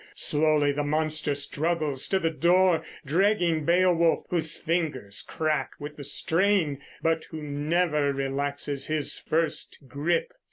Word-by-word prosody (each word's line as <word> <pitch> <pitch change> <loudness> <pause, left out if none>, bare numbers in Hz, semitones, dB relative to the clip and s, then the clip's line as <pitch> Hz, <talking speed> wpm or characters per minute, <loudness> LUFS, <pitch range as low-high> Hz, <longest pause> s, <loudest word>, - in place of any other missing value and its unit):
Slowly 150 - +3
the 145 +1 -2
monster 155 0 0
struggles 150 0 -1
to 190 - +2
the 165 -3 0
door, 175 +1 +3 0.2
dragging 170 -1 +2
Beowulf, 170 -1 +3
whose 165 -2 -1
fingers 150 - -2
crack 155 -1 -2
with 145 0 -8
the 145 - -8
strain, 160 0 +1 0.2
but 165 0 +1
who 155 -2 -8
never 150 0 0
relaxes 140 +1 -3
his 155 -2 +1
first 160 -1 -1
grip. 170 - -1
155 Hz, 125 wpm, -26 LUFS, 145-170 Hz, 0.2 s, Slowly